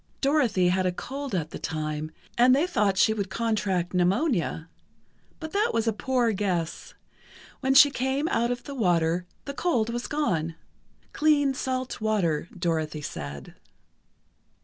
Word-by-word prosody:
Dorothy 255 Hz, -11 st, +2 dB
had 185 Hz, 0 st, +1 dB
a -, -, +1 dB
cold 270 Hz, +5 st, -5 dB
at 160 Hz, -3 st, -2 dB
the -, -, -6 dB
time, 155 Hz, -1 st, -3 dB, 0.3 s
and 250 Hz, +2 st, +6 dB
they 290 Hz, +5 st, +2 dB
thought 210 Hz, -, +1 dB
she 220 Hz, +2 st, +4 dB
would 200 Hz, -3 st, -3 dB
contract 205 Hz, -5 st, -1 dB
pneumonia. 180 Hz, -, +1 dB, 0.7 s
But 315 Hz, -1 st, -6 dB
that 420 Hz, +4 st, +1 dB
was 230 Hz, 0 st, +1 dB
a 225 Hz, -, +2 dB
poor 245 Hz, +1 st, +1 dB
guess. 185 Hz, -5 st, -2 dB, 0.6 s
When 265 Hz, 0 st, +1 dB
she 285 Hz, +1 st, +8 dB
came 265 Hz, +4 st, -1 dB
out 235 Hz, +1 st, +1 dB
of 245 Hz, 0 st, -3 dB
the 280 Hz, -, -7 dB
water, 175 Hz, -6 st, +1 dB, 0.2 s
the 280 Hz, -, -5 dB
cold 245 Hz, -9 st, 0 dB
was 240 Hz, 0 st, -3 dB
gone. 170 Hz, -, -1 dB, 0.6 s
Clean, 290 Hz, -3 st, +3 dB
salt 255 Hz, -2 st, -3 dB
water, 185 Hz, -7 st, 0 dB
Dorothy 160 Hz, -3 st, -1 dB
said. 70 Hz, -, -7 dB
215 Hz, 150 wpm, -26 LUFS, 175-265 Hz, 0.7 s, she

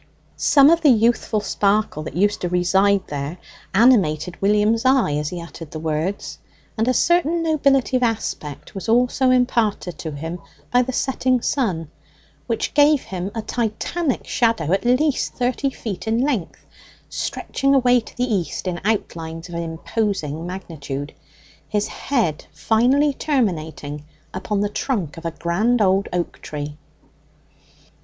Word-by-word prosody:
Some 285 Hz, +1 st, +5 dB
of 335 Hz, 0 st, +3 dB
the 305 Hz, -, +5 dB
youthful 230 Hz, -2 st, +2 dB
sparkle 205 Hz, -4 st, 0 dB
that 155 Hz, -, -7 dB
used 205 Hz, +3 st, +1 dB
to 180 Hz, -, -1 dB
reside 190 Hz, +2 st, +2 dB
there 145 Hz, +3 st, -5 dB, 0.3 s
animated 190 Hz, -, +3 dB
William's 210 Hz, +3 st, +3 dB
eye 260 Hz, -, +3 dB
as 150 Hz, 0 st, -1 dB
he 180 Hz, -, -5 dB
uttered 170 Hz, -2 st, -9 dB
the 155 Hz, -, -7 dB
words, 160 Hz, +5 st, -3 dB, 0.4 s
and 225 Hz, +1 st, 0 dB
a -, -, +4 dB
certain 340 Hz, +4 st, +2 dB
nobility 275 Hz, -5 st, +2 dB
of -, -, -3 dB
aspect 215 Hz, -, -3 dB
was 195 Hz, +3 st, -6 dB
also 250 Hz, +3 st, +3 dB
imparted 235 Hz, -7 st, +1 dB
to 160 Hz, -, -4 dB
him 165 Hz, +4 st, -5 dB, 0.3 s
by 245 Hz, -, +5 dB
the 255 Hz, +1 st, -2 dB
setting 255 Hz, -1 st, +1 dB
sun, 180 Hz, -, -1 dB, 0.6 s
which 230 Hz, -2 st, -2 dB
gave 290 Hz, -1 st, +4 dB
him 185 Hz, 0 st, -4 dB
a 225 Hz, -, -3 dB
Titanic 245 Hz, +7 st, -2 dB
shadow 225 Hz, -10 st, +1 dB
at 195 Hz, -, 0 dB
least 260 Hz, +4 st, +1 dB
thirty 255 Hz, +2 st, 0 dB
feet 220 Hz, -5 st, -6 dB
in 225 Hz, +1 st, +1 dB
length, 245 Hz, -, -2 dB, 0.4 s
stretching 275 Hz, 0 st, -1 dB
away 250 Hz, -2 st, +4 dB
to 225 Hz, -, -13 dB
the 245 Hz, -, 0 dB
east 185 Hz, 0 st, -2 dB
in 175 Hz, -1 st, -3 dB
outlines 165 Hz, -5 st, -3 dB
of -, -, -9 dB
imposing 170 Hz, -1 st, -3 dB
magnitude, 150 Hz, -6 st, -6 dB, 0.6 s
his 210 Hz, -1 st, 0 dB
head 225 Hz, -, -1 dB
finally 240 Hz, -, +2 dB
terminating 160 Hz, -, -2 dB, 0.3 s
upon 200 Hz, +2 st, -2 dB
the 205 Hz, -, +1 dB
trunk 205 Hz, -, -2 dB
of 165 Hz, -, -10 dB
a -, -, +1 dB
grand 190 Hz, +9 st, 0 dB
old 195 Hz, -1 st, +2 dB
oak 175 Hz, -1 st, -3 dB
tree. 150 Hz, 0 st, -6 dB
210 Hz, 145 wpm, -21 LUFS, 170-250 Hz, 0.6 s, Some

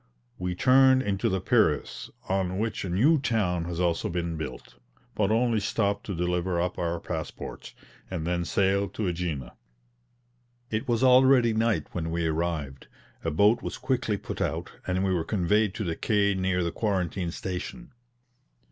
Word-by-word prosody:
We 90 Hz, 0 st, -2 dB
turned 130 Hz, +4 st, +5 dB
into 100 Hz, -4 st, 0 dB
the 95 Hz, -, 0 dB
Piraeus, 95 Hz, -6 st, +1 dB, 0.2 s
on 95 Hz, -1 st, 0 dB
which 110 Hz, +1 st, -2 dB
a 95 Hz, -, -4 dB
new 135 Hz, -, +4 dB
town 95 Hz, -10 st, 0 dB
has 85 Hz, 0 st, -4 dB
also 85 Hz, -2 st, 0 dB
been 85 Hz, -1 st, -2 dB
built, 75 Hz, -5 st, -7 dB, 0.4 s
but 100 Hz, -2 st, +1 dB
only 115 Hz, 0 st, +2 dB
stopped 100 Hz, 0 st, -1 dB
to 100 Hz, -, -3 dB
deliver 90 Hz, +1 st, 0 dB
up 90 Hz, +1 st, -2 dB
our 85 Hz, 0 st, -1 dB
passports, 80 Hz, -2 st, -6 dB, 0.3 s
and 85 Hz, -4 st, -4 dB
then 85 Hz, 0 st, 0 dB
sailed 100 Hz, +2 st, +1 dB
to 110 Hz, -, -2 dB
AEgina. 85 Hz, -8 st, -2 dB, 1.2 s
It 110 Hz, +5 st, -2 dB
was 120 Hz, 0 st, +1 dB
already 130 Hz, -2 st, +6 dB
night 110 Hz, 0 st, +1 dB
when 80 Hz, -2 st, -3 dB
we 85 Hz, 0 st, -1 dB
arrived; 80 Hz, -4 st, -2 dB, 0.4 s
a 80 Hz, -, 0 dB
boat 100 Hz, +9 st, +3 dB
was -, -, -5 dB
quickly 125 Hz, -5 st, -1 dB
put -, -, -6 dB
out, -, -, -2 dB, 0.2 s
and 95 Hz, +1 st, 0 dB
we 95 Hz, -1 st, +1 dB
were 85 Hz, -3 st, 0 dB
conveyed 105 Hz, +2 st, +1 dB
to 110 Hz, -, -3 dB
the 85 Hz, -4 st, -2 dB
quay 100 Hz, 0 st, +2 dB
near 95 Hz, -1 st, 0 dB
the 85 Hz, -, -1 dB
quarantine 95 Hz, -3 st, -1 dB
station. 95 Hz, -, -6 dB
95 Hz, 165 wpm, -27 LUFS, 85-110 Hz, 1.2 s, already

